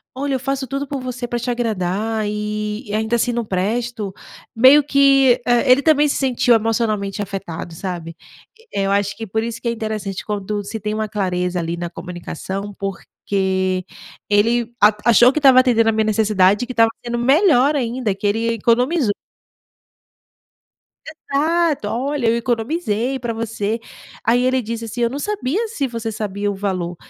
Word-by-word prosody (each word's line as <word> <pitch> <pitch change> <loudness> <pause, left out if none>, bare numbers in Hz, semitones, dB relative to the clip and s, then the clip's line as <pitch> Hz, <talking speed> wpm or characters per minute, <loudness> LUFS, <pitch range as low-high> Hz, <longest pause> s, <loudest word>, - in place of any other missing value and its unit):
"Olha, 275 0 -1
eu - - -1
faço 270 0 -3
tudo 275 +2 -3
por 275 -1 -4
você, 250 -1 -5
pra 240 0 -2
te 245 - -4
agradar, 220 -1 -1
eh, - - -1
e 210 0 -4
ainda 220 +2 0
assim 245 - +1
não 235 -1 -2
presto.". 210 +2 -2 0.4
Meio 265 +6 +7
que, 275 -3 +4
eh, 240 +2 +3
ele 260 +3 +6
também 300 -2 +4
se - - 0
sentiu 250 -2 +2
emocionalmente 215 -3 -1
afetado, 190 -4 -6
sabe? 170 -2 -6 0.6
Eh, 200 - -1
eu 195 - 0
acho 200 0 0
que 225 - -5
por 220 +3 -1
isso 230 0 -5
que 235 - -4
é - - +1
interessante, 215 -4 -4
quando 205 0 -3
se 220 +2 -6
tem 210 +1 -3
uma 215 -1 -2
clareza 180 -3 -1
ali 170 0 -3
na 175 0 -4
comunicação, 185 +3 -6
porque 190 -1 -2 0.4
ele 230 +3 +2
a 210 +1 +6
achou 240 +2 +6
que 305 - 0
estava 265 -3 +7
atendendo 230 -3 +3
a - - +4
minha 220 0 +1
necessidade, 210 -1 +3
e - - -20
que 255 - -5
estava 230 -1 +4 0.2
sendo 240 0 -2
melhor 285 +1 +4
ainda, 240 -4 -1
que 205 - -2
ele 225 +3 0
economizou! 245 - +2 1.9
Exato! 315 -3 0
"Olha, 265 +2 -1
eu 225 - +3
economizei 240 +1 -1
pra 235 -2 -3
você!" 225 -1 -3 0.4
Aí, 245 +2 +3
ele 255 0 +2
disse 230 +1 -5
assim: 235 +2 -5
"Eu 235 - +2
não 275 - -5
sabia 415 - -2
se 290 - -2
você 230 -2 -4
sabia 205 -1 -3
o 200 - -5
valor.". 185 -3 -3
225 Hz, 175 wpm, -20 LUFS, 205-255 Hz, 1.9 s, Meio